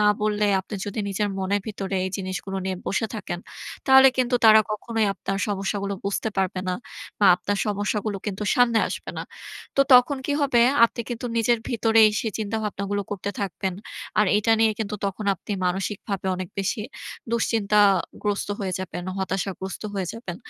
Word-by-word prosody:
না 210 - +4 0.2
বললে, 210 0 +1
আপনি 200 - -9
যদি 205 - -5
নিজের 205 +1 -1
মনের 195 +2 0
ভিতরে 195 -2 -4
এই 190 - -2
জিনিসগুলো 195 0 -4
নিয়ে 190 -1 -2
বসে 220 +3 0
থাকেন, 205 -5 -4 0.5
তাহলে 265 0 +8
কিন্তু 250 -1 +1
তারা 220 0 +9
কখনোই 220 +1 -1
আপনার 195 0 -3
সমস্যাগুলো 200 0 -2
বুঝতে 200 +2 -1
পারবে 190 -1 0
না। 180 - +1 0.4
বা 205 - +5
আপনার 205 +1 -2
সমস্যাগুলো 205 0 -1
কিন্তু 205 0 -3
সামনে 235 -2 +4
আসবে - - -5
না। - - -3 0.5
তো 275 - +5
তখন 250 +3 +6
কি 290 - 0
হবে? 265 -4 +3 0.2
আপনি 235 - -1
কিন্তু 240 +1 -4
নিজের 230 +1 +3
ভিতরেই 225 -2 +5
সেই 220 -3 -3
চিন্তাভাবনাগুলো 205 -2 -2
করতে 200 0 -3
থাকবেন। 190 -1 -2 0.5
আর 210 - +4
এটা 225 +2 +2
নিয়ে 225 0 +5
কিন্তু 210 0 -3
তখন 200 +2 -4
আপনি 195 - -7
মানসিকভাবে 195 +1 -3
অনেক 185 -1 -5
বেশি 200 +4 -1 0.5
দুশ্চিন্তাগ্রস্ত 205 -3 +1
হয়ে 190 -2 -2
যাবেন, 180 -1 -5
হতাশাগ্রস্ত 190 0 -3
হয়ে 190 -2 -2
যাবেন। 190 -7 -7
205 Hz, 160 wpm, -24 LUFS, 195-220 Hz, 0.5 s, তারা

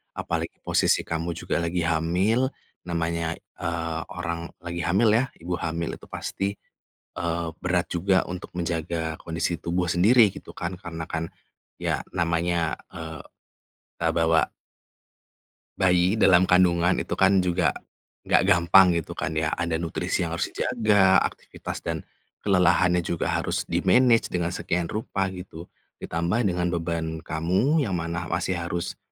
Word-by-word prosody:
Apalagi 85 0 -3
posisi - - +2
kamu 80 +1 -3
juga 85 - -2
lagi 85 +1 -1
hamil, 90 +10 +2 0.4
namanya, 85 -1 -1 0.2
eee, 85 -1 -2
orang 85 0 -4 0.2
lagi 85 0 -4
hamil 95 +7 +3
ya, 120 +5 +3
ibu 85 +1 -4
hamil 85 0 -3
itu - - -15
pasti, 100 +1 -3 0.6
eee, 85 0 -2 0.2
berat 90 -1 +1
juga 95 +2 +1
untuk 90 0 -7
menjaga 80 -1 -2
kondisi 80 0 -2
tubuh 90 +1 0
sendiri 105 +8 +5
gitu - - -10
kan 85 +2 -3
karena 85 -3 -7
kan, 80 0 -4 0.5
ya - - -1
namanya, 85 -1 0 0.2
eee, 80 -2 -7 0.8
eee, - - +2
bawa 80 -1 +3 1.3
bayi 90 +3 +3
dalam 90 -4 +6
kandungan, 90 -1 +4
itu - - -2
kan 95 0 +4
juga 90 -3 +2 0.6
nggak - - +4
gampang 90 -1 +6
gitu 85 +1 -6
kan 90 - -3
ya. 80 0 0
Ada 85 -1 -1
nutrisi 85 +1 -1
yang 85 - -4
harus 85 - -2
dijaga, 100 -4 +3
aktivitas - - -5
dan - - -2 0.4
kelelahannya 90 -2 +3
juga 85 -1 -1
harus - - -1
di-manage 125 -2 +3
dengan 85 -1 -1
sekian 85 -1 -2
rupa 95 -3 -2
gitu, 90 -2 -9 0.3
ditambah 85 +8 0
dengan 90 0 -1
beban 80 -1 -3
kamu 90 - +1
yang 95 - -2
mana 85 0 -3
masih 90 +2 -1
harus 85 0 -4
85 Hz, 140 wpm, -25 LUFS, 85-90 Hz, 1.3 s, dalam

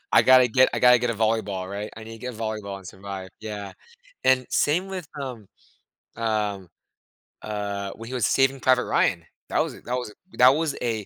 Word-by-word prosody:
I - - +7
gotta 130 -1 +6
get 130 +3 +5
I - - -1
gotta 125 0 +6
get 120 0 0
a - - -2
volleyball, 105 -4 -1
right? 105 +1 -5
I 110 - -9
need 115 - -9
to 115 - -10
get 125 0 -6
a - - -11
volleyball 110 -3 -4
and 95 - -14
survive, 95 0 -8
yeah. 105 -2 -6 0.5
And 130 -1 +4
same 175 +6 +1
with, 185 -5 -6
um, 120 -7 -6 0.7
um, 105 -5 -2 0.7
uh, 100 -2 -4
when 115 0 -10
he - - -7
was 125 -6 +1
Saving 135 0 +2
Private 130 -1 +3
Ryan. - - +1 0.2
That - - +1
was - - 0
that 125 - -3
was 125 -4 -4 0.2
that 125 +1 +7
was 150 +1 +1
a 110 -4 -2
115 Hz, 200 wpm, -25 LUFS, 100-125 Hz, 0.7 s, I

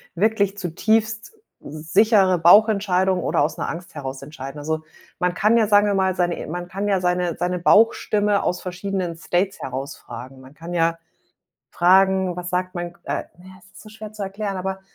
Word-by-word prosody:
wirklich 200 +1 +1
zutiefst 220 - -1 0.3
sichere 185 +6 +2
Bauchentscheidung 190 0 +4
oder - - +1
aus 150 +2 -1
'ner - - -3
Angst 170 +1 -8
heraus 135 -2 -6
entscheiden. 135 0 -8
Also, 155 +2 -3 0.4
man 180 0 +1
kann 215 +5 +3
ja, 220 -2 +3
sagen 205 0 +4
wir 205 - +1
mal, 190 -1 +1
seine 175 -2 -1
man 175 +2 -5
kann 195 +3 -4
ja 195 -2 +2
seine 180 -1 0
seine 180 +1 -1
Bauchstimme 210 +1 +3
aus 180 - -1
verschiedenen 185 -1 -4
States 180 +3 -1
heraus 135 +2 -5
fragen. 130 +3 -10
Man 130 +1 -15
kann 165 +3 -8
ja 165 -1 +1 0.7
fragen, 190 0 +3
was 180 0 -5
sagt 185 0 -2
mein 175 -1 -5
K 175 - -26
äh, - - -3
ne, 180 - -16
es - - -22
ist - - -13
so 215 - -13
schwer 215 0 -10
zu 215 -1 -7
erklären, 195 0 -4
aber 190 +1 -4
180 Hz, 185 wpm, -22 LUFS, 170-200 Hz, 0.7 s, Bauchentscheidung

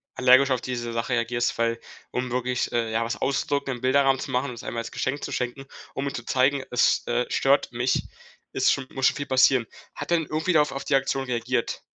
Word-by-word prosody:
allergisch 130 +2 +5
auf 130 -1 +1
diese 120 -2 -4
Sache 115 +2 -2
reagierst, 120 0 0
weil, 115 0 +1 0.3
um 125 -1 -3
wirklich, 125 0 -1
äh, 115 -2 -1
ja, 115 +1 +1
was 115 - -3
auszudrucken, 140 -1 -1
im 120 - -11
Bilderrahmen 135 0 +3
zu 135 - -5
machen, 125 +2 0
um 120 - -7
es 115 - -10
einmal 115 -1 -3
als 115 - -8
Geschenk 140 +2 -3
zu - - -4
schenken, 130 +2 -3 0.3
um 140 +1 -3
ihm 140 - -3
zu 120 - -6
zeigen: 135 +1 +2
„Es, 125 0 +2
äh, 120 +1 0
stört 140 0 +2
mich.“ 120 +2 0 0.5
Ist - - +3
schon 135 -1 -4
muss 135 0 -1
schon - - +4
viel 140 - -3
passieren. 130 -2 +4 0.3
Hat - - -7
er 170 - +5
denn 160 - -2
irgendwie 155 +4 -1
darauf 150 -1 +3
auf 135 - -5
die - - +2
Aktion 135 0 0
reagiert? 120 -1 -2
130 Hz, 230 wpm, -25 LUFS, 120-135 Hz, 0.5 s, allergisch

